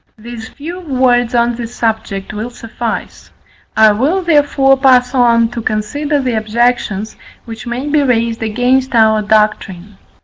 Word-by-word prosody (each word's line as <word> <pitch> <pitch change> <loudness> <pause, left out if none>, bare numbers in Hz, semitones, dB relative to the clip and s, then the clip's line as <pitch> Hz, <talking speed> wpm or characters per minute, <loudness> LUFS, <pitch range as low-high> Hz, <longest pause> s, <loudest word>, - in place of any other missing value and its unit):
These 225 0 -9
few 335 +5 -8
words 255 -6 +1
on 235 0 +2
this 235 0 -7
subject 215 -3 -3
will 215 +3 -5
suffice: 230 -1 -6 0.5
I 220 -1 +6
will 290 - 0
therefore 290 -4 +3
pass 255 -2 +3
on 235 -3 +3
to 240 0 -6
consider 285 +8 -2
the 255 -3 -1
objections, 220 -1 -1 0.3
which 225 +1 -9
may 245 +4 -4
be 295 0 +2
raised 230 -4 0
against 245 +4 0
our 220 -1 +4
doctrine. 205 -2 -1
235 Hz, 140 wpm, -14 LUFS, 220-260 Hz, 0.5 s, I